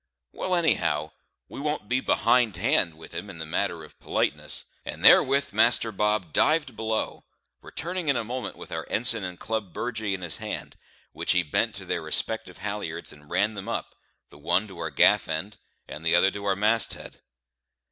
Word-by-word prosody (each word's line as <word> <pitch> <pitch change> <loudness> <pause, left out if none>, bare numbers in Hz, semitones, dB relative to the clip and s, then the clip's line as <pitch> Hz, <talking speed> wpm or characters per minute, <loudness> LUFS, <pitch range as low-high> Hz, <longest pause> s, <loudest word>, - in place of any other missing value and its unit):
Well, 185 - -1
anyhow, 80 - +1 0.4
we - - -9
won't 150 -6 -2
be 125 +3 +2
behindhand 95 -11 +2
with 80 - -12
him 85 +5 -6
in 95 - -9
the 80 - -5
matter 85 0 -1
of 75 - -15
politeness;" - - -2 0.2
and - - -5
therewith 140 -2 +6
Master 115 +1 +4
Bob 105 -5 0
dived 150 -6 +3
below, 110 0 -2 0.4
returning 175 0 -4
in 140 - +3
a 115 - -1
moment 125 +3 -5
with - - -11
our - - -4
ensign 115 -2 +3
and 90 -1 -6
club 110 -6 -3
burgee 110 -5 -2
in 90 - -8
his 85 -3 -1
hand, - - -6 0.4
which - - 0
he 90 - +3
bent 75 - 0
to - - -8
their - - -2
respective 110 0 -1
halliards 105 +1 -4
and 75 0 -17
ran 105 +2 +1
them 100 -2 -6
up - - -3 0.4
the 70 - -16
one 95 +7 +1
to 95 -3 -11
our - - -2
gaff - - +4
end, 80 +7 -3 0.3
and 75 +1 -8
the 80 +1 +4
other 95 +2 +5
to 100 +1 -7
our 100 -1 +2
mast 110 +3 +2
head. - - -11
105 Hz, 190 wpm, -26 LUFS, 85-115 Hz, 0.4 s, therewith